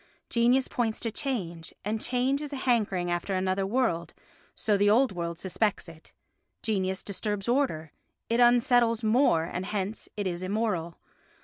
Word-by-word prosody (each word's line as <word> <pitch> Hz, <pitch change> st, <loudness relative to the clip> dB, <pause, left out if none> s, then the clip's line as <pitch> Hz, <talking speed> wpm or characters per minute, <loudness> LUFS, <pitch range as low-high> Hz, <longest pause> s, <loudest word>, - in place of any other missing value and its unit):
Genius 245 Hz, +3 st, +3 dB
points 225 Hz, -3 st, -1 dB
to 230 Hz, -, -3 dB
change, 185 Hz, -, -4 dB
and 215 Hz, +1 st, -1 dB
change 260 Hz, +3 st, 0 dB
is 295 Hz, -1 st, -5 dB
a -, -, -4 dB
hankering 210 Hz, -9 st, 0 dB
after 175 Hz, +3 st, -1 dB
another 185 Hz, +1 st, 0 dB
world, 200 Hz, -7 st, 0 dB, 0.4 s
so 210 Hz, -, +1 dB
the 205 Hz, +1 st, +3 dB
old 245 Hz, +4 st, +4 dB
world 170 Hz, -2 st, -4 dB
suspects 195 Hz, +2 st, -1 dB
it. 165 Hz, -1 st, -12 dB, 0.5 s
Genius 190 Hz, -4 st, -1 dB
disturbs 205 Hz, 0 st, -3 dB
order, 235 Hz, -, 0 dB, 0.4 s
it 230 Hz, +1 st, +1 dB
unsettles 240 Hz, -1 st, +4 dB
mores 215 Hz, -, +3 dB
and 185 Hz, +1 st, -3 dB
hence 205 Hz, +1 st, -3 dB
it 205 Hz, -, -2 dB
is 175 Hz, -1 st, -2 dB
immoral. 185 Hz, -4 st, -2 dB
210 Hz, 150 wpm, -28 LUFS, 185-240 Hz, 0.5 s, old